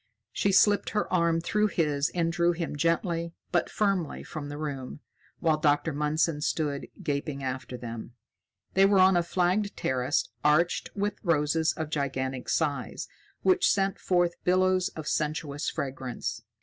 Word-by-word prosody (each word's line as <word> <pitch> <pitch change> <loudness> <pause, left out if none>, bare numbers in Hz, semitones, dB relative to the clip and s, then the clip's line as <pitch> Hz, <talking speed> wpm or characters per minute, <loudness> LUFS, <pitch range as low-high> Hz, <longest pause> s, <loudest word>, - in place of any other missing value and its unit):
She 200 - +1
slipped 205 +1 +4
her 210 -2 -2
arm 170 -2 +2
through 210 +5 +1
his 150 -7 0
and 165 -1 +1
drew 175 -1 +2
him 165 -3 -4
gently 170 +2 0 0.2
but 175 - +1
firmly 195 -6 0
from 150 -3 -6
the 145 - -6
room, 145 -2 -5 0.4
while 160 -2 +3
Dr. 150 +1 +2
Mundson 150 +1 0
stood 150 -2 -1 0.2
gaping 140 -1 -2
after 130 -1 -4
them. 115 -1 -7 0.6
They 195 +1 +6
were 200 0 +4
on 190 0 +6
a 175 - +4
flagged 185 +4 0
terrace 130 +2 0 0.2
arched 155 +4 +2
with 205 0 -2
roses 160 -2 +2
of 155 -1 -5
gigantic 130 -3 -2
size, 150 -4 -1 0.4
which 370 -1 +4
sent 195 -1 +1
forth 175 -2 +1
billows 185 0 +3
of 155 - -6
sensuous 150 0 -1
fragrance. 130 -4 -4
160 Hz, 150 wpm, -28 LUFS, 145-180 Hz, 0.6 s, They